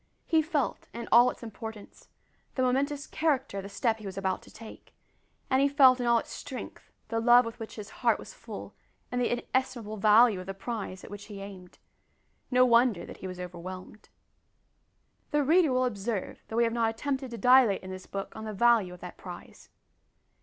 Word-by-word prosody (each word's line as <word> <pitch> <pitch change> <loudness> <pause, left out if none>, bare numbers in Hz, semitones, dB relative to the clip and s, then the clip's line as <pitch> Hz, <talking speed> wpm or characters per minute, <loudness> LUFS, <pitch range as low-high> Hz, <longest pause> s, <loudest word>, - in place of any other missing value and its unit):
He 320 -2 +3
felt, 305 -4 -2
in 235 0 -5
all 240 +1 +7
its - - -8
importance, 220 -2 -9 0.5
the 260 - +1
momentous 280 +3 0
character 285 -10 -1
of 195 - -4
the 200 - -8
step 225 +1 0
he 215 - -11
was 190 0 -7
about 190 -1 -1
to - - -16
take, 220 0 -13 0.5
and 260 0 +2
he 280 - +5
felt 270 -3 +6
in 245 - -1
all 235 0 +5
its - - -4
strength - - -8 0.2
the 225 - 0
love 240 +1 +6
with 230 +1 -7
which 225 - -8
his 210 -1 -8
heart - - +3
was - - -11
full, - - -9 0.4
and 245 0 -1
the 245 - +1
inestimable 240 -3 -2
value 215 0 +5
of 185 - -9
the 195 - -5
prize 195 -3 -5
at - - -11
which 205 0 -8
he 205 -2 -9
aimed. 190 -2 -10 0.7
No 255 0 +5
wonder 235 -5 +3
that - - -10
he 190 - -7
was 185 -1 -7
overwhelmed. 185 +3 -8 1.2
The 295 -1 +2
reader 320 +1 +4
will 255 0 +2
observe 210 -3 -3
that 220 - -6
we 235 - +4
have 230 -1 +1
not 230 -1 +2
attempted 265 +3 -3
to 235 - -7
dilate 250 -5 +5
in 185 - -7
this 185 0 -8
book 195 0 -6
on 220 - -7
the 215 - -5
value 215 -4 +3
of 180 - -18
that 180 - -9
prize. 175 -2 -11
230 Hz, 205 wpm, -29 LUFS, 200-255 Hz, 1.2 s, all